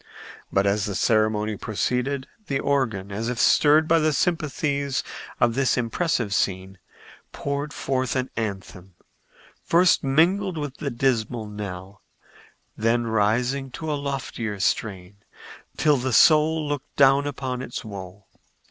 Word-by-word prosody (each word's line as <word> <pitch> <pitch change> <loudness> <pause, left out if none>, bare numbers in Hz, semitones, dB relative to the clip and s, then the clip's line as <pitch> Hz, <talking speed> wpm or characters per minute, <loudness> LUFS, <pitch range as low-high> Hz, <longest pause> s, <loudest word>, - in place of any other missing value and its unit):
But 95 0 +2
as 100 +1 +1
the 100 -3 -4
ceremony 110 0 +1
proceeded, 125 +6 -2 0.2
the 135 -1 -1
organ, 115 -9 -1
as 110 +4 -3
if 125 - -3
stirred 155 +6 +4
by 165 0 +4
the 155 -1 +2
sympathies 140 -3 -1 0.4
of 120 -1 +3
this 135 +1 +1
impressive 120 - -1
scene, 95 -1 -1 0.5
poured 140 +1 -3
forth 130 -3 -2
an 130 0 -2
anthem, 95 -4 -6 0.7
first 175 0 +3
mingling 170 +6 +2
with 145 -2 -5
the 140 - -3
dismal 120 -3 -1
knell, 100 -2 -8 0.7
then 115 +2 +1
rising 120 +5 0
to 160 +2 -4
a - - 0
loftier 135 -7 -4
strain, 95 0 -2 0.6
till 150 -2 +3
the 130 0 -2
soul 155 +1 +5
looked 145 -2 -5
down 140 +1 +4
upon 130 -3 -4
its 120 -2 -6
woe. 95 -1 -9
125 Hz, 130 wpm, -24 LUFS, 105-140 Hz, 0.7 s, soul